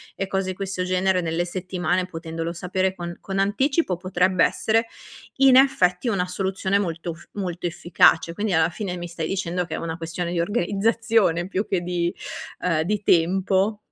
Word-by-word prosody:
e 195 Hz, -, -3 dB
cose 190 Hz, -1 st, -1 dB
di -, -, -7 dB
questo 190 Hz, -1 st, -3 dB
genere, 185 Hz, 0 st, +1 dB
nelle 165 Hz, 0 st, -1 dB
settimane 180 Hz, 0 st, -1 dB
potendolo 165 Hz, -1 st, -5 dB
sapere 185 Hz, +2 st, -1 dB
con 175 Hz, -1 st, -7 dB
con 195 Hz, 0 st, -4 dB
anticipo, 205 Hz, -, +1 dB
potrebbe 185 Hz, 0 st, +2 dB
essere 225 Hz, +1 st, +1 dB, 0.5 s
in 270 Hz, -1 st, +6 dB
effetti 245 Hz, -8 st, +3 dB
una 195 Hz, -5 st, 0 dB
soluzione 190 Hz, +1 st, -1 dB
molto 170 Hz, -3 st, -3 dB
f -, -, -16 dB
molto 180 Hz, -3 st, -4 dB
efficace. 170 Hz, -1 st, +3 dB
Quindi 210 Hz, 0 st, -1 dB
alla 160 Hz, 0 st, +3 dB
fine 180 Hz, +2 st, -4 dB
mi 175 Hz, 0 st, -5 dB
stai 165 Hz, -2 st, -4 dB
dicendo 180 Hz, -1 st, -2 dB
che 170 Hz, -, -7 dB
è -, -, -4 dB
una 165 Hz, 0 st, -4 dB
questione 170 Hz, +1 st, -4 dB
di 175 Hz, -, -1 dB
organizzazione 205 Hz, -1 st, +1 dB
più 195 Hz, +2 st, -2 dB
che 185 Hz, -3 st, 0 dB
di, 175 Hz, -1 st, -1 dB, 0.5 s
uhm, 165 Hz, -3 st, +1 dB
di 210 Hz, +4 st, -1 dB
tempo 190 Hz, +4 st, +2 dB
185 Hz, 175 wpm, -23 LUFS, 170-195 Hz, 0.5 s, in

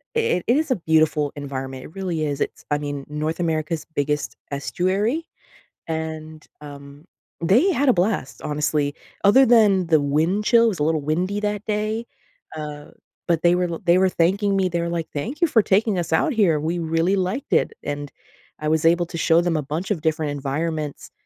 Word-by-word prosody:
it 455 Hz, -, +1 dB
is 290 Hz, +4 st, +2 dB
a -, -, +4 dB
beautiful 155 Hz, -4 st, +2 dB
environment. 135 Hz, -2 st, -6 dB
It -, -, -12 dB
really 175 Hz, -5 st, -2 dB
is. 145 Hz, -2 st, -3 dB
It's, -, -, -3 dB
I 145 Hz, -, +3 dB
mean, 145 Hz, -1 st, -5 dB
North 155 Hz, +3 st, -3 dB
America's 160 Hz, -1 st, -1 dB
biggest 145 Hz, +1 st, -1 dB, 0.2 s
estuary, 195 Hz, -, -1 dB, 0.6 s
and, 160 Hz, -1 st, -5 dB, 0.2 s
um, 145 Hz, 0 st, -11 dB, 0.4 s
they 230 Hz, -, +4 dB
had 285 Hz, -5 st, +1 dB
a -, -, +6 dB
blast, 190 Hz, -, -1 dB
honestly, 150 Hz, -1 st, -1 dB, 0.3 s
other 230 Hz, +7 st, +6 dB
than 205 Hz, -6 st, +4 dB
the 160 Hz, -2 st, +4 dB
wind 160 Hz, +8 st, +1 dB
chill 235 Hz, +1 st, +5 dB
it -, -, +4 dB
was 195 Hz, -, -2 dB
a -, -, 0 dB
little 155 Hz, -1 st, +1 dB
windy 180 Hz, +7 st, -1 dB
that 210 Hz, 0 st, -2 dB
day, 215 Hz, +2 st, -2 dB, 0.5 s
uh, 150 Hz, -1 st, -6 dB, 0.4 s
but 165 Hz, -2 st, +1 dB
they 175 Hz, 0 st, +5 dB
were 180 Hz, 0 st, +1 dB
l 165 Hz, -, -5 dB
they 175 Hz, +1 st, +5 dB
were 190 Hz, 0 st, +4 dB
thanking 195 Hz, +4 st, +1 dB
me, 190 Hz, -1 st, +2 dB
they 170 Hz, 0 st, -1 dB
were 170 Hz, -, -2 dB
like, 170 Hz, -1 st, -3 dB
"Thank 235 Hz, -, -4 dB
you 340 Hz, -, +7 dB
for 225 Hz, -7 st, +4 dB
taking 200 Hz, 0 st, +2 dB
us 170 Hz, -1 st, -3 dB
out 320 Hz, -, +2 dB
here. 190 Hz, -, +3 dB
We 165 Hz, +3 st, -2 dB
really 165 Hz, +3 st, +1 dB
liked 190 Hz, +8 st, -2 dB
it." -, -, +2 dB
and 145 Hz, 0 st, -4 dB, 0.5 s
I 155 Hz, -, -3 dB
was 160 Hz, 0 st, +1 dB
able 175 Hz, +1 st, +4 dB
to 170 Hz, -, -7 dB
show 165 Hz, 0 st, +4 dB
them 175 Hz, -2 st, 0 dB
a -, -, -2 dB
bunch 155 Hz, +8 st, -4 dB
of 185 Hz, -, 0 dB
different 155 Hz, -2 st, -1 dB
environments, 150 Hz, +2 st, -3 dB
165 Hz, 195 wpm, -22 LUFS, 150-195 Hz, 0.6 s, you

